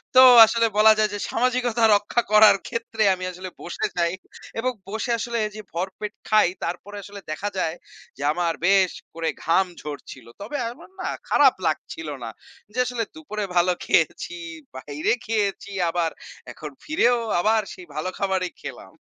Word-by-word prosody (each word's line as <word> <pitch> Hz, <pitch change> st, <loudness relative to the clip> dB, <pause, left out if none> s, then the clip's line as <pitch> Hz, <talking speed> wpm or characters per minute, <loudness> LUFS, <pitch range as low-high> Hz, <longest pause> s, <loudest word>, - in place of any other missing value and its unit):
তো 255 Hz, -, +10 dB, 0.2 s
আসলে 230 Hz, +1 st, +2 dB
বলা 215 Hz, +1 st, +8 dB
যায় 215 Hz, -1 st, +3 dB
যে, 205 Hz, -, -3 dB
সামাজিকতা 245 Hz, -1 st, +1 dB
রক্ষা 205 Hz, +4 st, +1 dB
করার 215 Hz, -1 st, +8 dB
ক্ষেত্রে 225 Hz, -1 st, -2 dB
আমি 185 Hz, -, -8 dB
আসলে 185 Hz, +1 st, -8 dB
বসে 175 Hz, -, -3 dB
যাই 170 Hz, 0 st, +1 dB, 0.5 s
এবং 255 Hz, +3 st, 0 dB, 0.2 s
বসে 220 Hz, +4 st, -2 dB
আসলে 235 Hz, +1 st, -3 dB
এই 210 Hz, -, -5 dB
যে 215 Hz, -, -6 dB
ভরপেট 190 Hz, +4 st, -4 dB, 0.2 s
খাই 215 Hz, -3 st, +5 dB, 0.2 s
তারপরে 180 Hz, +4 st, -5 dB
আসলে 200 Hz, +1 st, -10 dB
দেখা 200 Hz, +6 st, -3 dB
যায় 165 Hz, -3 st, -1 dB, 0.4 s
যে -, -, -10 dB
আমার 170 Hz, 0 st, 0 dB
বেশ 190 Hz, -1 st, +4 dB, 0.2 s
করে 165 Hz, 0 st, -2 dB
ঘাম 180 Hz, +4 st, +3 dB, 0.2 s
ঝরছিল। 145 Hz, -4 st, -8 dB, 0.2 s
তবে 225 Hz, +9 st, -4 dB
আমার 245 Hz, -, -14 dB
না -, -, -3 dB, 0.2 s
খারাপ -, -, +6 dB
লাগছিল 160 Hz, -, -3 dB, 0.2 s
না। 115 Hz, -, -4 dB, 0.5 s
যে -, -, -1 dB
আসলে 245 Hz, -2 st, -2 dB
দুপুরে 215 Hz, -10 st, -5 dB
ভালো 175 Hz, +1 st, +4 dB
খেয়েছি, 175 Hz, +1 st, +1 dB, 0.4 s
বাইরে 145 Hz, +3 st, -2 dB
খেয়েছি 205 Hz, -3 st, -1 dB, 0.2 s
আবার 165 Hz, -1 st, 0 dB, 0.4 s
এখন 150 Hz, -1 st, -8 dB
ফিরেও 245 Hz, -6 st, +2 dB, 0.2 s
আবার 220 Hz, +4 st, +3 dB
সেই 180 Hz, -, -12 dB
ভালো 155 Hz, +4 st, -2 dB
খাবারই 190 Hz, -2 st, -1 dB
খেলাম। -, -, -9 dB
200 Hz, 160 wpm, -24 LUFS, 175-225 Hz, 0.5 s, তো